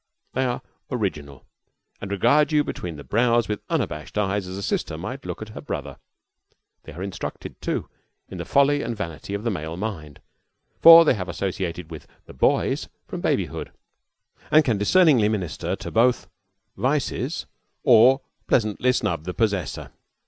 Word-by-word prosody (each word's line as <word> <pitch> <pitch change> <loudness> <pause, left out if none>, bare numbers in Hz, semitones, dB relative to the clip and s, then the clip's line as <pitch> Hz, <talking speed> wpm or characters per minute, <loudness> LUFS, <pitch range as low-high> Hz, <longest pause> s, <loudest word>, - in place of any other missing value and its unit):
They 130 +1 0
are 125 +1 -2 0.3
original, 75 - -4 0.6
and 100 - -5
regard 120 - +3
you 150 -1 +3
between 85 - -5
the 70 - -9
brows 120 +2 +2
with 105 -1 -3
unabashed 75 +6 -3
eyes 100 -2 0
as 95 +1 -6
a 100 - -5
sister 80 - -2
might 105 - -6
look - - -5
at 110 - -11
her 110 - -9
brother. - - -6 0.9
They 80 - -10
are 90 +5 -6
instructed, 100 -1 -6
too, - - -2 0.4
in - - -8
the - - -4
folly 140 +1 +3
and 115 -1 -4
vanity 85 +2 -5
of 100 - -5
the 115 - 0
male 80 -2 -5
mind, 85 -9 -5 0.6
for 165 0 +10
they - - +5
have 90 -6 -5
associated 90 -2 -4
with 80 - -9 0.2
"the - - -13
boys" 65 - +1 0.2
from - - -6
babyhood, - - -1 0.8
and 155 0 +5
can 115 -6 +1
discerningly 135 - +4
minister 95 -7 -2
to - - -8
both 120 +2 +2 0.5
vices 135 - -1 0.4
or 130 +1 +6 0.3
pleasantly 115 +2 +2
snub 85 -9 -1
the 90 - -5
possessor. 100 -6 -1
105 Hz, 160 wpm, -24 LUFS, 90-125 Hz, 0.9 s, for